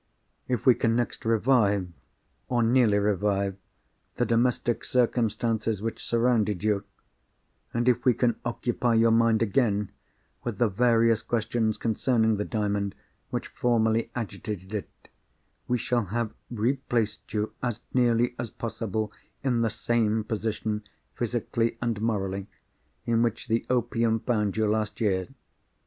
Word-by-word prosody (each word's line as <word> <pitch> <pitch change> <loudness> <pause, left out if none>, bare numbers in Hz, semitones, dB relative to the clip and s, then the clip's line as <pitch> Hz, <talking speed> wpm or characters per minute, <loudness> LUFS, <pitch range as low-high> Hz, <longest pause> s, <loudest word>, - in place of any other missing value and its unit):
If 125 -3 -1
we 130 - +8
can 115 -1 +1
next 120 -1 -2
revive, 110 -4 +3 0.6
or 120 -2 +2
nearly 115 -3 +4
revive, 100 -1 +1 0.6
the - - +1
domestic 120 0 +1
circumstances 115 -3 +1
which 115 +2 -4
surrounded 115 -5 +1
you; 105 -2 +1 0.9
and 120 +1 -1
if 120 -1 +3
we 125 -3 +4
can 120 -2 +2
occupy 120 0 0
your 115 0 +5
mind 115 0 +4
again 105 -3 +1 0.5
with 120 -5 -3
the 120 0 +3
various 115 +1 +3
questions 110 -1 0
concerning 110 -1 +1
the 105 - -1
Diamond 100 -2 -1 0.3
which - - -3
formerly 115 -2 +1
agitated 105 -3 -5
it, 105 -3 -3 0.8
we 125 - +2
shall 120 -1 0
have 110 +3 -2 0.2
replaced 120 -1 -1
you, 105 0 -2
as 120 -2 -2
nearly 120 -1 +3
as 120 -2 -3
possible 110 -2 -3 0.3
in 125 -4 +1
the 115 - +2
same 110 -1 +1
position, 110 -1 -2 0.3
physically 115 0 -1
and 115 -4 -2
morally, 100 -3 -1 0.6
in 115 -1 +2
which 115 +1 -1
the 115 0 0
opium 115 -2 +1
found 105 -4 0
you 110 - +2
last 105 0 -1
year. 95 -4 +1
115 Hz, 130 wpm, -27 LUFS, 105-120 Hz, 0.9 s, we